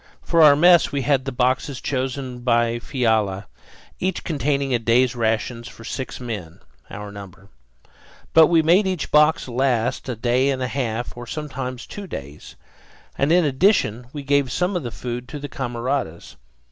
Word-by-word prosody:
For 170 Hz, -1 st, +2 dB
our 150 Hz, -2 st, +8 dB
mess 175 Hz, +3 st, +5 dB
we 140 Hz, -2 st, -1 dB
had 135 Hz, -1 st, +1 dB
the 135 Hz, -, -3 dB
boxes 130 Hz, +2 st, 0 dB
chosen 130 Hz, -1 st, -3 dB
by 120 Hz, -1 st, +1 dB
Fiala, 110 Hz, -7 st, 0 dB, 0.5 s
each 185 Hz, -1 st, -2 dB
containing 140 Hz, -3 st, -1 dB
a 120 Hz, -, +2 dB
day's 120 Hz, +2 st, +2 dB
rations 115 Hz, +1 st, -1 dB
for 115 Hz, -, -12 dB
six 130 Hz, +3 st, -5 dB
men, 105 Hz, -10 st, -6 dB, 0.3 s
our 105 Hz, 0 st, -8 dB
number. 100 Hz, -1 st, -12 dB, 0.8 s
But 160 Hz, -1 st, +8 dB
we 165 Hz, -2 st, +3 dB
made 180 Hz, +5 st, +4 dB
each 185 Hz, -5 st, -3 dB
box 150 Hz, 0 st, +4 dB
last 125 Hz, -1 st, 0 dB
a 125 Hz, -, -2 dB
day 125 Hz, +4 st, +1 dB
and 130 Hz, -2 st, -1 dB
a -, -, -1 dB
half, 120 Hz, -3 st, -3 dB
or 120 Hz, 0 st, -9 dB
at 150 Hz, -1 st, -5 dB
times 130 Hz, -1 st, -5 dB
two 205 Hz, -1 st, -8 dB
days, 70 Hz, -, -9 dB, 0.6 s
and 140 Hz, +3 st, +1 dB
in 175 Hz, -1 st, +4 dB
addition 130 Hz, -, +2 dB
we 145 Hz, -1 st, -7 dB
gave 140 Hz, -2 st, +1 dB
some 180 Hz, +7 st, 0 dB
of 175 Hz, -, 0 dB
the 120 Hz, -, -5 dB
food 120 Hz, +3 st, -6 dB
to 150 Hz, -, -7 dB
the 145 Hz, -, -6 dB
camaradas. 120 Hz, -, -4 dB
130 Hz, 170 wpm, -22 LUFS, 115-145 Hz, 0.8 s, our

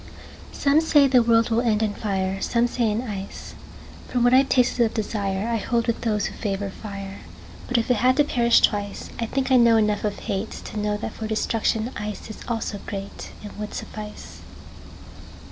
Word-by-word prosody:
SOME 285 Hz, +2 st, +3 dB
say 295 Hz, -3 st, +5 dB
the 255 Hz, -2 st, +5 dB
world 230 Hz, 0 st, +3 dB
will 225 Hz, +1 st, +3 dB
end 220 Hz, -3 st, +1 dB
in 210 Hz, -1 st, 0 dB
fire, 195 Hz, -2 st, -2 dB
Some 235 Hz, 0 st, +2 dB
say 240 Hz, -2 st, 0 dB
in 215 Hz, +3 st, -1 dB
ice. 200 Hz, -5 st, -7 dB, 0.5 s
From 245 Hz, -1 st, 0 dB
what 245 Hz, +1 st, +5 dB
I've 265 Hz, +1 st, +5 dB
tasted 250 Hz, -1 st, +3 dB
of 225 Hz, -, -1 dB
desireI 210 Hz, +1 st, -1 dB
hold 235 Hz, -1 st, 0 dB
with 235 Hz, -1 st, -1 dB
those 210 Hz, -3 st, 0 dB
who -, -, -4 dB
favor 200 Hz, -2 st, -3 dB
fire. 195 Hz, -1 st, -8 dB, 0.5 s
But 250 Hz, -, +1 dB
if 235 Hz, +2 st, +1 dB
it 245 Hz, -, +3 dB
had 255 Hz, +4 st, +3 dB
to 295 Hz, -, +6 dB
perish 235 Hz, -4 st, +3 dB
twice,I 205 Hz, +2 st, -1 dB
think 265 Hz, +2 st, -1 dB
I 260 Hz, -, +7 dB
know 235 Hz, -2 st, +6 dB
enough 210 Hz, -1 st, +1 dB
of 210 Hz, -1 st, -2 dB
hateTo 210 Hz, 0 st, -4 dB
know 210 Hz, 0 st, 0 dB
that 210 Hz, -, -5 dB
for 220 Hz, -, -5 dB
destruction 220 Hz, +1 st, 0 dB
iceIs 210 Hz, +1 st, -6 dB
also 225 Hz, -3 st, -2 dB
greatAnd 200 Hz, +1 st, -8 dB
would 210 Hz, 0 st, -5 dB
suffice. 210 Hz, -1 st, -8 dB
220 Hz, 180 wpm, -24 LUFS, 205-240 Hz, 0.5 s, I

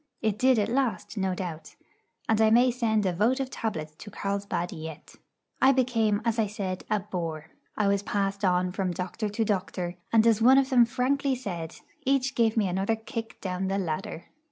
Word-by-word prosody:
It 215 Hz, -2 st, 0 dB
did 260 Hz, -1 st, +4 dB
at 210 Hz, -, +2 dB
last, 250 Hz, -2 st, -1 dB
no 190 Hz, -3 st, -1 dB
doubt; 165 Hz, -4 st, -6 dB, 0.5 s
and 220 Hz, 0 st, +2 dB
I 220 Hz, -, +5 dB
may 245 Hz, +3 st, +5 dB
send 220 Hz, -4 st, +1 dB
a 185 Hz, -, +1 dB
votive 255 Hz, +8 st, +1 dB
tablet 155 Hz, -9 st, -4 dB
to 205 Hz, -, -9 dB
Carlsbad 200 Hz, -3 st, -3 dB
yet. 160 Hz, -1 st, -8 dB, 0.5 s
I 265 Hz, -, +7 dB
became, 230 Hz, -5 st, +1 dB
as 230 Hz, 0 st, +1 dB
I 220 Hz, -, +2 dB
said, 195 Hz, -3 st, -4 dB
a 210 Hz, -1 st, +1 dB
bore. 165 Hz, -5 st, -5 dB, 0.3 s
I 210 Hz, -, +2 dB
was 200 Hz, 0 st, +2 dB
passed 200 Hz, 0 st, -2 dB
on 180 Hz, -1 st, +2 dB
from 185 Hz, -1 st, -2 dB
doctor 185 Hz, +5 st, -3 dB
to 220 Hz, +2 st, -1 dB
doctor, 185 Hz, -3 st, -2 dB
and, 225 Hz, -1 st, +5 dB
as 225 Hz, -1 st, +4 dB
one 260 Hz, +4 st, +7 dB
of 275 Hz, 0 st, +2 dB
them 245 Hz, -2 st, +6 dB
frankly 265 Hz, +3 st, 0 dB
said, 175 Hz, -10 st, -5 dB, 0.3 s
each 270 Hz, -1 st, +1 dB
gave 230 Hz, -2 st, +2 dB
me 210 Hz, -3 st, +3 dB
another 195 Hz, +5 st, 0 dB
kick 225 Hz, 0 st, -7 dB
down 185 Hz, 0 st, -2 dB
the 195 Hz, +1 st, 0 dB
ladder. 165 Hz, -2 st, -3 dB
210 Hz, 190 wpm, -27 LUFS, 185-235 Hz, 0.5 s, I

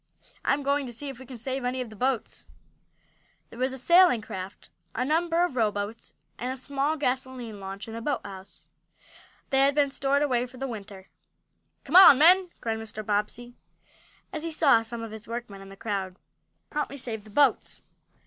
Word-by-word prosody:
"I'm 280 Hz, +1 st, +1 dB
going 280 Hz, 0 st, 0 dB
to 240 Hz, -, -7 dB
see 280 Hz, +5 st, -5 dB
if 265 Hz, -3 st, -9 dB
we 260 Hz, -, -12 dB
can 255 Hz, -1 st, -9 dB
save 260 Hz, +3 st, -3 dB
any 250 Hz, +1 st, -2 dB
of 245 Hz, -3 st, -5 dB
the -, -, -11 dB
boats." 255 Hz, 0 st, -2 dB, 1.0 s
There 230 Hz, -, -11 dB
was 260 Hz, +1 st, +1 dB
a 265 Hz, -, -5 dB
sailing 340 Hz, -, +5 dB
craft, 190 Hz, 0 st, -8 dB, 0.2 s
a 250 Hz, -, 0 dB
number 335 Hz, +3 st, +2 dB
of 345 Hz, -, -6 dB
rowboats, 215 Hz, -1 st, -2 dB, 0.2 s
and 250 Hz, +2 st, -2 dB
a 260 Hz, -, -5 dB
small 280 Hz, +4 st, -1 dB
gasoline 255 Hz, -5 st, -3 dB
launch 195 Hz, +2 st, -7 dB
in 225 Hz, -, -8 dB
the 230 Hz, -, -5 dB
boathouse. 200 Hz, -7 st, -5 dB, 0.9 s
They 270 Hz, -, +3 dB
had 275 Hz, +1 st, +4 dB
been 285 Hz, -2 st, +2 dB
stored 280 Hz, +1 st, +1 dB
away 250 Hz, -3 st, +1 dB
for 255 Hz, +1 st, -15 dB
the 270 Hz, -, -4 dB
winter. 200 Hz, -5 st, -8 dB, 0.7 s
"Come 290 Hz, -, -4 dB
on, 370 Hz, -8 st, +10 dB
men!" 360 Hz, +5 st, +6 dB
cried 225 Hz, -1 st, -2 dB
Mr. 215 Hz, -1 st, -7 dB
Bobbsey, 215 Hz, +4 st, -2 dB, 0.8 s
as 310 Hz, -, -3 dB
he 330 Hz, -, -3 dB
saw 280 Hz, -7 st, +4 dB
some 230 Hz, 0 st, -5 dB
of 225 Hz, -, -7 dB
his 220 Hz, 0 st, -9 dB
workmen 230 Hz, -4 st, -6 dB
in 195 Hz, -, -12 dB
the 195 Hz, -, -11 dB
crowd. 195 Hz, -3 st, -3 dB, 0.6 s
"Help 300 Hz, -2 st, -2 dB
me 280 Hz, -, -8 dB
save 225 Hz, -5 st, -5 dB
the 215 Hz, -, -15 dB
boats!" 280 Hz, +7 st, +2 dB
250 Hz, 190 wpm, -27 LUFS, 220-280 Hz, 1.0 s, on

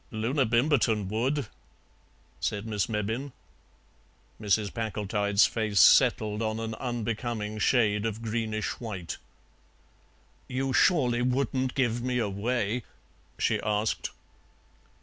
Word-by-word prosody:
"Loona 125 Hz, +4 st, 0 dB
Bimberton 115 Hz, -4 st, +2 dB
would," 130 Hz, +6 st, 0 dB, 0.9 s
said 105 Hz, 0 st, -2 dB
Miss 105 Hz, -3 st, -1 dB
Mebbin. 110 Hz, +6 st, -2 dB, 1.1 s
Mrs. 105 Hz, 0 st, +1 dB
Packletide's 105 Hz, -2 st, +1 dB
face 105 Hz, -3 st, 0 dB
settled 105 Hz, 0 st, +5 dB
on 110 Hz, 0 st, -1 dB
an 115 Hz, 0 st, -3 dB
unbecoming 115 Hz, -3 st, -3 dB
shade 105 Hz, -3 st, +2 dB
of 110 Hz, +1 st, -5 dB
greenish 110 Hz, -2 st, -2 dB
white. 100 Hz, -8 st, -5 dB, 1.3 s
"You 135 Hz, +1 st, -2 dB
surely 125 Hz, -6 st, +3 dB
wouldn't 130 Hz, +1 st, 0 dB
give 120 Hz, -3 st, +1 dB
me 125 Hz, 0 st, -1 dB
away?" 115 Hz, +2 st, -1 dB, 0.6 s
she -, -, +1 dB
asked. 105 Hz, +1 st, -1 dB
115 Hz, 100 wpm, -28 LUFS, 105-125 Hz, 1.3 s, settled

